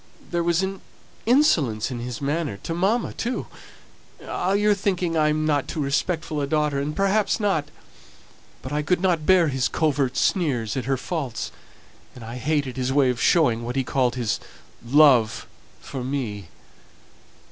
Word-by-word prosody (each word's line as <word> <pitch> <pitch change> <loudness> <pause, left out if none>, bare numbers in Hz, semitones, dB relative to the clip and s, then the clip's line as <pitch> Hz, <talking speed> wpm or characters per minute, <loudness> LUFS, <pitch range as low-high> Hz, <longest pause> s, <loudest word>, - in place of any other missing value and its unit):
There 175 -1 0
was 170 +2 +1
an 190 0 -4 0.5
insolence 150 - +3
in 120 - -4
his 120 +2 -6
manner 145 -5 -1
to 165 - -3
mamma, 195 +8 0
too. 240 +3 -3 0.8
Ah! 185 +2 -1
you're 210 +1 +3
thinking 185 -4 -1
that 160 - +1
I'm 155 0 +1
not 145 -3 +1
too - - -5
respectful 150 +2 -1
a 140 - -1
daughter 150 -1 +1
and 150 +2 -3
perhaps 195 +3 +1
not; 195 -8 +1 1.0
but 130 - -6
I 150 - +1
couldn't 175 0 +1
bear 180 -4 +5
his 135 -2 0
covert 140 -5 0
sneers 125 - 0
at 130 - -3
her 135 0 0
faults, 135 -5 -4 0.6
and 125 - -10
I 115 +2 -7
hated 140 -1 -1
his 130 0 -1
way 135 -2 +3
of 120 - -5
showing 130 -10 +3
what 120 +2 -5
he 135 - +1
called 125 -1 0
his 120 -4 -1 0.4
'love' 125 -4 +4 0.4
for 130 -3 -6
me. 115 - -4
145 Hz, 160 wpm, -24 LUFS, 125-175 Hz, 1.0 s, bear